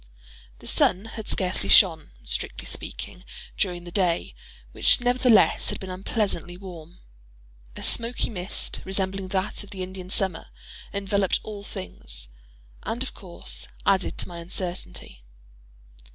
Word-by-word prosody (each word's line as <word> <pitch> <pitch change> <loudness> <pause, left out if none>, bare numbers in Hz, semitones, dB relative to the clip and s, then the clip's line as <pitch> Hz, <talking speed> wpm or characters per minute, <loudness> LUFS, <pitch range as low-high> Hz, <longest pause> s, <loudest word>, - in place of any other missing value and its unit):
The - - -14
sun 190 +4 +3
had 225 -1 -7
scarcely 180 - +1
shone—strictly - - +4
speaking—during 180 0 -4
the 175 - -8
day, 175 -3 +2 0.4
which - - +5
nevertheless, 245 -1 +5
had - - -2
been 190 -1 -5
unpleasantly 185 -2 -1
warm. 175 -3 -9 0.8
A - - -7
smoky 235 +1 +1
mist, 185 -1 -4
resembling 190 0 -1
that 190 +2 -1
of 205 - -13
the 190 -3 -4
Indian 185 0 -7
summer, 190 - 0 0.4
enveloped 200 -1 +2
all 210 -2 -5
things, 90 - -6 0.5
and 240 +3 -2
of 265 - -5
course, 180 -3 -3 0.2
added 195 -1 +3
to - - -2
my 175 -2 -7
uncertainty. 175 - -3
190 Hz, 125 wpm, -26 LUFS, 175-200 Hz, 0.8 s, which